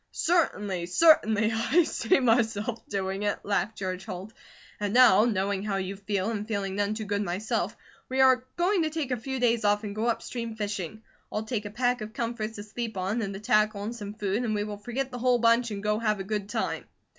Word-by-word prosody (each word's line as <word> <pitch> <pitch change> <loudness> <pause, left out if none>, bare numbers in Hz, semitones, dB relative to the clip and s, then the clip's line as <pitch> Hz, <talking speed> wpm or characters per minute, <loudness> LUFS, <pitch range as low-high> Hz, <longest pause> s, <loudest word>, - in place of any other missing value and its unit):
"Certainly! 205 - 0
Certainly! 220 - +4
I 235 +10 +3
see 230 -6 +2
myself 230 -2 +1
doing 195 -1 -2
it!" 205 -1 0
laughed 210 +2 -1
George 185 -1 -3
Holt. 190 +4 -7 0.5
"And 205 +1 -1
now, 230 -4 +7
knowing 200 -3 0
how 205 -1 -2
you 195 0 -3
feel, 200 +1 -2
and 210 -1 -4
feeling 200 -3 -2
none 205 +1 0
to 220 - -4
good 205 0 -1
myself, 200 +2 -2 0.3
we 260 +1 -1
are 260 -1 +5
going 360 +2 +2
to 315 - +1
take 305 -4 -3
a - - +2
few 265 +3 -4
days 235 -2 +2
off 205 +1 +2
and 205 -1 -4
go 220 +2 -1
upstream, 230 -1 -3
fishing. 205 -1 -4 0.3
I'll 215 - -2
take 220 -2 -3
a - - -4
pack 245 +2 0
of 215 +1 -6
comforts 230 -2 -3
to 205 - -6
sleep 220 0 -5
on, 195 +5 -1
and 200 -2 -3
the - - -6
tackle 210 -1 +2
and 225 +3 -4
some 205 -2 -7
food, 205 +2 -1
and 220 -3 0
we 205 - 0
will 210 0 -5
forget 245 +6 -4
the 245 - -5
whole 250 0 +3
bunch 235 +1 +3
and 205 -2 -5
go 210 0 +1
have 215 -3 0
a - - -3
good 205 0 -3
time. - - -2
215 Hz, 220 wpm, -27 LUFS, 200-235 Hz, 0.5 s, now